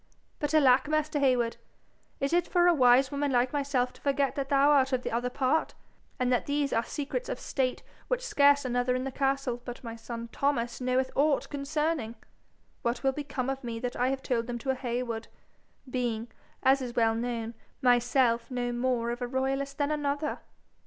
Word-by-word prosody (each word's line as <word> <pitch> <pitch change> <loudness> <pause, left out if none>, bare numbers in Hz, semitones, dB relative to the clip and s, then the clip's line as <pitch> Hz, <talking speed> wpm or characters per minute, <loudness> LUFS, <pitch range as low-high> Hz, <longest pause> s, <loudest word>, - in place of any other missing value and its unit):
But 295 +1 -1
alack, 265 -2 +5
master 310 -1 0
Heywood! 250 -4 +2 0.6
is 275 +3 -1
it 350 0 +2
for 350 -1 +3
a 350 - +6
wise 260 -1 +5
woman 285 0 -1
like 250 +1 +2
myself 275 -3 0
to - - -19
forget 280 -1 +1
that 275 -1 -3
thou 280 +1 +5
art 270 -2 +4
of 255 -1 0
the - - -3
other 240 +2 -1
part, 265 +5 0 0.4
and 250 0 +1
that 245 - 0
these 285 -1 0
are 230 - +2
secrets 300 - -4
of - - -3
state 255 -2 -2 0.2
which - - -1
scarce 285 - +4
another 245 0 +1
in 255 - -1
the 270 - -3
castle 270 -2 -1
but 245 0 -8
my 230 -1 -6
son 230 0 -7
Thomas 240 -4 -1
knoweth 255 +1 +1
aught 285 0 +2
concerning! 290 -4 -1 0.7
What 235 +1 -2
will 270 - +3
become 275 -2 -4
of 270 0 -3
me 235 -1 -4
that 245 +1 -4
I 250 - +1
have 265 0 -2
told 235 -2 -1
them 240 -1 -3
to 270 - 0
a - - +1
Heywood, 240 -3 -3 0.6
being, 240 -3 -2 0.3
as 265 +1 +4
is 245 -2 -5
well 225 -1 +3
known, 230 0 -3 0.3
myself 245 -1 +3
no 245 -1 -2
more 240 -1 0
of 240 +1 -5
a 245 - -1
royalist 270 +2 -2
than 285 0 0
another?' 290 0 -1
260 Hz, 195 wpm, -29 LUFS, 245-280 Hz, 0.7 s, a